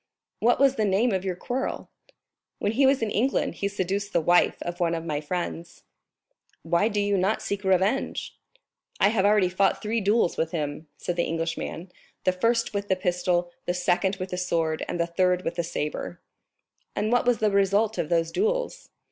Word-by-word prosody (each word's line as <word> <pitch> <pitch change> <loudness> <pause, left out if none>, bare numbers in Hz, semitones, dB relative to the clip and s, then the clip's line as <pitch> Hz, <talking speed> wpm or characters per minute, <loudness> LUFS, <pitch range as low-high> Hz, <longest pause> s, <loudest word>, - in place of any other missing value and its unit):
"What 240 +2 +3
was 270 -1 +4
the 215 - +2
cause 215 +4 +2
of 190 -1 -1
your 185 -2 -2
quarrel?" 250 +8 -4 0.7
"When 205 - 0
he 265 +4 +4
was 270 -3 +3
in 215 - -1
England 255 +7 +1
he 200 - +2
seduced 200 +1 -2
the 170 - +4
wife 175 +2 +3
of 175 +1 -5
one 170 -1 +1
of 165 0 -5
my 150 -3 -2
friends." 170 +1 -5 0.8
"Why 170 +6 +2
do 210 -2 -1
you 205 -1 +1
not 195 +4 0
seek 200 0 -3
revenge?" 190 +7 0 0.6
"I 200 - +5
have 205 -3 +1
already 205 -3 +4
fought 190 +2 +1
three 220 +2 -1
duels 205 -2 +2
with 160 +1 -1
him," 150 -1 -3
said 175 - -4
the 170 - +2
Englishman, 165 +2 -4 0.3
"the 185 - +3
first 230 +6 +1
with 200 0 -2
the 190 - +2
pistol, 180 -1 0 0.2
the 175 - 0
second 180 +2 +1
with 185 -1 -6
the 180 - -2
sword, 165 -3 0
and 175 - -3
the 170 - +2
third 180 +1 +1
with 165 - -1
the 170 0 -2
sabre." 150 - -4 0.8
"And 215 +2 0
what 245 0 +2
was 245 -2 +4
the 215 -1 +1
result 200 +3 +2
of 155 - -1
those 165 -1 +1
duels?" - - -1
190 Hz, 195 wpm, -26 LUFS, 175-215 Hz, 0.8 s, I